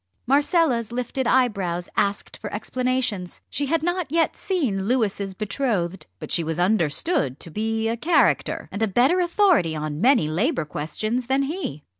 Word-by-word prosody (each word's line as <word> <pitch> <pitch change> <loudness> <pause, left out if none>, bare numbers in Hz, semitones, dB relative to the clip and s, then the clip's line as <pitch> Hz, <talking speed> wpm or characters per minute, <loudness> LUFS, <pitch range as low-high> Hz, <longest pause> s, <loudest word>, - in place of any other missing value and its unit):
Marcella's 280 - +2
lifted 250 +1 -2
eyebrows 195 -9 +1
asked 200 0 -1
for - - -7
explanations. 250 -8 -2
She 285 - -1
had 325 +2 0
not 350 -3 -1
yet 330 0 +2
seen 260 - -1
Louis's 205 -5 0
betrothed, 200 -5 -2
but - - -8
she 170 - +3
was 160 0 -3
understood 175 - +1
to 165 - -9
be 220 +3 -1
a 230 - 0
character, 320 +9 +1
and 200 - -5
a 220 - +3
better 250 - +3
authority 345 - +3
on 150 0 -4
many 245 - +4
Labour 180 - 0
questions 215 +12 -3
than 270 +1 +2
he. 275 - -4
230 Hz, 155 wpm, -23 LUFS, 180-275 Hz, -, many